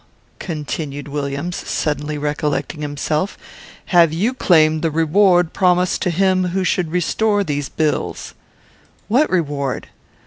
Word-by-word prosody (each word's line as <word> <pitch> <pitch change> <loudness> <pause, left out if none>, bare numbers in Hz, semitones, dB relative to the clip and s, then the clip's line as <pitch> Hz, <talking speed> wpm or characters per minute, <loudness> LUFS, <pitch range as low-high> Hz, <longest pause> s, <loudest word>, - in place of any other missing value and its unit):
continued 150 -3 -5
Williams, 145 +4 -3
suddenly 150 0 -2
recollecting 150 +1 -2
himself; 150 +5 -2 0.5
"have 170 -3 +4
you 200 +10 0
claimed 160 -9 +3
the 165 - +1
reward 175 +2 +3
promised 180 -1 +2
to - - +1
him 185 +1 +2
who 185 +2 -1
should 180 -2 0
restore 205 +4 +1
these 145 -5 -3
bills?" 155 -2 -2 0.7
"What 260 +8 +3
reward?" 145 -7 -2
160 Hz, 115 wpm, -19 LUFS, 150-185 Hz, 0.7 s, have